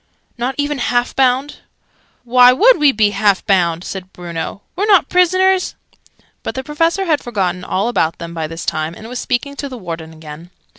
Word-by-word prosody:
"Not 245 +2 -3
even 290 -1 -1
half 245 0 0
bound?" 265 +2 +1 0.7
"Why 250 +1 +6
would 445 - +5
we 295 -2 +5
be 210 -4 +2
half 205 -2 +1
bound?" 175 -3 +1
said 190 -1 -7
Bruno. 175 +2 -6
"We're 405 +4 -1
not 395 -4 +4
prisoners!" 370 +1 +2 0.7
But - - -5
the 265 - -4
Professor 330 +7 0
had 310 -4 +1
forgotten 185 -6 -2
all 195 +4 -1
about 165 -9 0
them 170 -1 -8
by 160 -2 -3
this 165 +1 -7
time, 155 +2 -2
and 220 - -10
was 250 +1 -5
speaking 280 +3 -2
to 280 - -4
the 255 - -8
Warden 165 -5 -7
again. 160 +1 -11
240 Hz, 185 wpm, -17 LUFS, 175-285 Hz, 0.7 s, Why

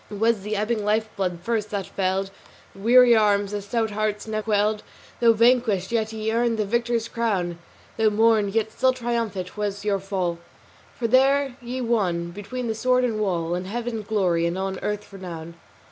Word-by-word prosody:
It 205 - -7
was 225 0 +2
the 210 +2 -3
ebbing 215 +1 -1
life 215 +1 0
blood 180 -3 -2
first 220 -1 -1
that 200 -2 -3
failed 190 +1 -1 0.4
The - - -15
weary 240 +3 +6
arms; 205 -2 +2
the 205 0 -3
stout 220 +2 -1
hearts 210 0 -2
never 215 -1 -3
quailed. 210 0 +1 0.4
Though 230 -1 +5
vanquished, 230 -4 +2
yet 220 -2 0
ye 220 0 -2
earned 235 0 +1
the 215 - 0
victor's 235 +1 0
crown: 190 -8 -1 0.4
Though 220 -1 +4
mourned, 215 -1 +2
yet 220 -1 +1
still 260 +3 +2
triumphant 230 -7 -3
was 205 -1 -3
your 200 -2 +1
fall 185 -3 -2 0.6
For 235 - -1
there 270 +2 +3
ye 245 +2 -4
won, 185 -8 0
between 205 +7 -6
the 225 - 0
sword 250 +3 +2
and 225 -3 0
wall, 175 -5 -1
In 180 +1 -3
Heaven 230 +2 -3
glory 185 -6 +1
and 170 +2 -2
on 190 0 -3
earth 210 0 -4
renown." 170 -4 -8
215 Hz, 185 wpm, -24 LUFS, 195-230 Hz, 0.6 s, weary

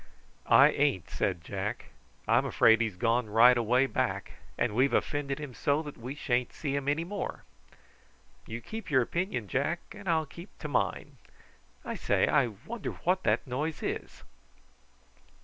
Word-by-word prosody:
"I 140 +3 +7
ain't," 140 - 0
said 90 -4 -1
Jack. 100 +6 -5 0.4
"I'm - - +4
afraid 115 0 +4
he's 110 -5 -1
gone 115 +3 +1
right 120 +4 +7
away 125 +3 +3
back; - - -2 0.3
and - - 0
we've 130 +5 +2
offended 140 -2 -1
him 145 -4 -7
so 145 +5 0
that 145 -2 -8
we 125 +4 -7
sha'n't 125 -4 -1
see 140 -3 -3
him 140 -1 -3
any 150 +3 +1
more." 200 +3 -5 1.0
"You 115 +1 -6
keep 225 - -7
your 130 -4 +4
opinion, 170 - -2
Jack, 140 - -1
and 195 - -7
I'll 160 -2 +2
keep 170 +6 -13
to 150 - -6
mine. 145 - -1 0.7
I - - -3
say, - - +1
I 140 -5 +3
wonder 130 - -6
what 185 +2 +2
that - - +2
noise 145 +5 -3
is!" - - -5
135 Hz, 160 wpm, -29 LUFS, 120-155 Hz, 1.0 s, I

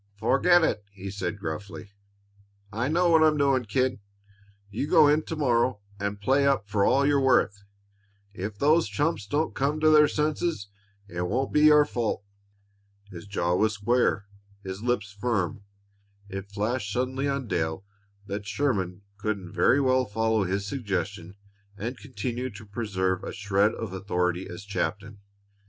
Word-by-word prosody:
"Forget 165 - +4
it!" 105 -9 0
he 100 -1 -7
said 100 -1 -3
gruffly. 100 +4 -6 0.8
"I 115 +4 -1
know 170 +3 +2
what 160 -1 +6
I'm 155 -1 +4
doing, 135 -3 +2
kid. 125 +4 0 0.7
You 115 +8 -2
go 150 - +6
in 150 +2 +4
to 160 - -4
morrow 125 -5 +1 0.2
and 100 0 -3
play 135 +6 +2
up 135 -7 +1
for 100 0 +1
all 135 +6 +3
you're 140 -1 +3
worth. 120 -6 +2 0.7
If 100 +2 -5
if - - -27
those 155 +6 +3
chumps 145 -9 -1
don't 150 +7 0
come 145 +3 0
to 155 0 +4
their 150 -1 +7
senses, 150 - -1 0.4
it 90 -2 -5
won't 130 +7 -1
be 150 0 +5
your 150 -1 +7
fault." 115 -6 -2 0.9
His 90 +2 -10
jaw 90 -3 0
was 110 +4 +2
square; 105 0 +1 0.4
his 95 +1 -6
lips 115 -4 -1
firm. 100 -3 -2 0.6
It 95 0 -7
flashed 105 +1 -2
suddenly 130 +4 -1
on 140 -3 -2
Dale 80 -1 -2 0.4
that 100 0 -5
Sherman 100 -10 -1
couldn't 100 -3 -4
very 140 - +4
well 130 -1 +2
follow 110 0 0
his 100 +2 -2
suggestion 100 -6 -4 0.4
and 115 +6 -4
continue 130 -1 -4
to 110 +1 -10
preserve 95 -4 -2
a - - -5
shred 100 +2 +1
of 110 -5 -6
authority 90 -1 -1
as 90 +3 -9
captain. 100 +1 -3
110 Hz, 155 wpm, -26 LUFS, 100-135 Hz, 0.9 s, their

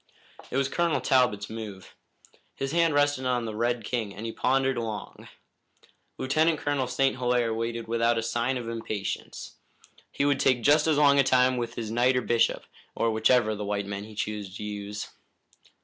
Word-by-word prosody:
It - - -2
was 135 -1 +2
Colonel 170 +2 0
Talbot's 125 -6 +2
move. 105 -4 -8 0.6
His 135 0 -3
hand 165 -2 +2
rested 145 -2 +2
on 125 -2 0
the 110 -1 -5
red 120 +1 0
king 110 -4 -3
and 105 +4 -7
he 115 - -3
pondered 135 +2 +1
long. 110 -2 -6 0.9
Lieutenant 155 +4 +2
Colonel 145 -3 -1
St. 135 +1 +1
Hilaire 125 -2 +1
waited 115 +1 -3
without 115 0 +1
a 115 - -1
sign 120 +3 -1
of 120 -2 -6
impatience. 110 -3 -5 0.5
He 140 - 0
would 140 -2 +2
take 125 -3 +2
just 150 +3 +4
as 155 -2 +3
long 140 -1 +5
a - - +6
time 130 -1 +3
with 120 -1 -4
his 110 -2 -4
knight 125 +3 +3
or - - +2
bishop, 115 -1 +1 0.3
or 115 - +1
whichever 110 +1 +3
of 105 - -4
the - - -3
white 100 0 -2
men 100 0 -5
he 110 0 -12
chose 105 -2 -4
to - - -7
use. 105 0 -5
120 Hz, 185 wpm, -27 LUFS, 110-135 Hz, 0.9 s, a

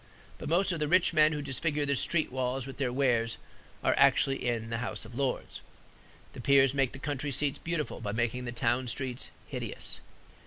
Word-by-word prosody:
But - - -5
most 185 +4 +3
of 170 - -2
the 150 - 0
rich 175 +1 +4
men 155 -1 +5
who 150 -2 -3
disfigure 145 +2 -1
the 140 0 +1
street 155 +2 0
walls 130 0 -1
with 135 - -8
their 130 -3 0
wares 120 -4 +1 0.5
are - - +4
actually 135 0 +4
in 115 -2 -1
the 115 - -1
House 110 -2 -3
of 115 - -12
Lords. 135 +1 -2 0.7
The 130 - -8
peers 135 0 +5
make 135 -2 +1
the - - -6
country 145 +1 -3
seats 140 +1 +1
beautiful 165 -3 -3
by 105 -2 -2
making 120 +3 -1
the 120 - -3
town 120 +2 0
streets 125 +1 -3 0.2
hideous. - - -5
135 Hz, 195 wpm, -30 LUFS, 120-145 Hz, 0.7 s, men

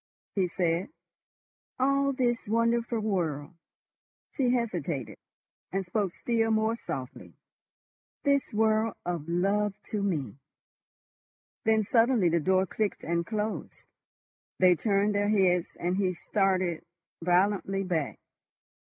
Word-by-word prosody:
he 190 -3 +1
said. 175 +2 -1 0.9
"All 275 +1 +2
this 245 -4 0
wonderful 230 +1 +1
world—" 170 -8 -2 0.8
she 260 -4 +1
hesitated, 175 - -2 0.5
and 195 0 -1
spoke 190 0 -1
still 225 -2 0
more 220 +1 +2
softly—"this 250 - -5
world 220 +1 +2
of 170 -3 -3
love 200 +4 +1 0.2
to 210 - -1
me." 145 - -2 1.3
Then 220 -1 +4
suddenly 230 -3 +3
the 170 +1 +2
door 185 +4 +2
clicked 210 +3 -2
and 170 0 -1
closed. 215 0 -4 0.7
They 185 -1 +6
turned 200 +4 +1
their 205 0 +1
heads, 185 -4 +2
and 180 +2 0
he 185 -2 +1
started 185 -2 0 0.4
violently 195 +2 +2
back. 165 -6 -2
195 Hz, 110 wpm, -28 LUFS, 175-220 Hz, 1.3 s, They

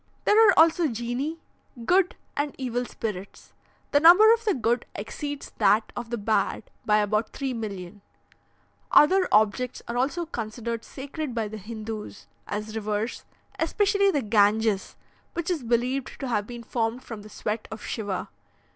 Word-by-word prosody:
"There 440 +1 +6
are - - +7
also 330 +1 +5
genii, 245 +6 -3 0.5
good 365 +3 +3 0.2
and 290 0 -2
evil 245 -2 -2
spirits. 200 -5 -6 0.4
The 285 - +5
number 360 +8 +8
of 460 -1 -2
the 415 -5 +2
good 235 0 0
exceeds 285 +7 -5
that 215 +2 +3
of 240 -1 -5
the 235 - -2
bad 215 +1 0 0.2
by 210 0 +5
about 210 +1 0
3,000,000. 210 -7 -5 0.9
"Other 370 +5 +6
objects 215 +4 +2
are 235 - -3
also 290 +7 0
considered 230 -4 -4
sacred 285 -1 -6
by 225 -2 -1
the 215 +1 -7
Hindoos, 215 0 -7 0.2
as 215 +1 -4
rivers, 215 +1 -3 0.3
especially 400 -1 +2
the 290 -8 0
Ganges, 210 -1 +2 0.4
which 340 +1 -2
is 335 -5 -1
believed 245 +3 -1
to 270 - -3
have 210 -3 0
been 240 -1 -8
formed 230 +2 -2
from 225 -5 -8
the 210 - -12
sweat 215 +1 -4
of 220 - -8
Shiva. 205 -5 -3
235 Hz, 150 wpm, -26 LUFS, 215-290 Hz, 0.9 s, number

